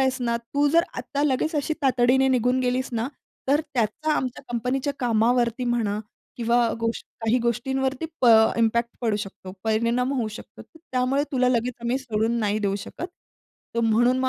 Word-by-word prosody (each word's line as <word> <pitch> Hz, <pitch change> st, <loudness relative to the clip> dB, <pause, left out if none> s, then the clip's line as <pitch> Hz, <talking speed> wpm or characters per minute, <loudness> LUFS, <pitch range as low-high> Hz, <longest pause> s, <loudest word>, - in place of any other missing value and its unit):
आहेस 265 Hz, 0 st, +2 dB
ना, 235 Hz, -1 st, +1 dB
तू 260 Hz, +5 st, 0 dB
जर 335 Hz, +3 st, +4 dB, 0.2 s
आता 285 Hz, -, -3 dB
लगेच 295 Hz, +3 st, 0 dB
अशी 295 Hz, +2 st, 0 dB
तातडीने 260 Hz, 0 st, +3 dB
निघून 250 Hz, 0 st, +2 dB
गेलीस 255 Hz, +1 st, 0 dB
ना, 230 Hz, +1 st, -1 dB, 0.4 s
तर 285 Hz, +2 st, +4 dB
त्याचा 245 Hz, +7 st, 0 dB
आमच्या 255 Hz, -3 st, -2 dB
कंपनीच्या 255 Hz, +4 st, -1 dB
कामावरती 235 Hz, +1 st, +2 dB
म्हणा 225 Hz, -4 st, 0 dB, 0.4 s
किंवा 235 Hz, 0 st, +2 dB
गोष्ट 230 Hz, 0 st, -2 dB
काही 225 Hz, +3 st, +2 dB
गोष्टींवरती 265 Hz, +4 st, -1 dB
प 250 Hz, -, +3 dB, 0.3 s
इम्पॅक्ट 235 Hz, +1 st, +2 dB
पडू 225 Hz, -4 st, +1 dB
शकतो. 195 Hz, -2 st, -7 dB
परिणाम 235 Hz, +4 st, +1 dB
होऊ 245 Hz, -5 st, -1 dB
शकतो. 215 Hz, -, -11 dB
तर 320 Hz, -, -20 dB
त्यामुळे 255 Hz, +2 st, +2 dB
तुला 255 Hz, -2 st, +3 dB
लगेच 250 Hz, 0 st, 0 dB
आम्ही 240 Hz, +2 st, 0 dB
सोडून 230 Hz, -2 st, -1 dB
नाही 210 Hz, -1 st, 0 dB
देऊ 200 Hz, -2 st, 0 dB
शकत. 340 Hz, -, -6 dB, 0.7 s
तर 235 Hz, -, +1 dB
म्हणून 235 Hz, +3 st, +3 dB
मग 260 Hz, 0 st, +1 dB
245 Hz, 170 wpm, -24 LUFS, 230-260 Hz, 0.7 s, जर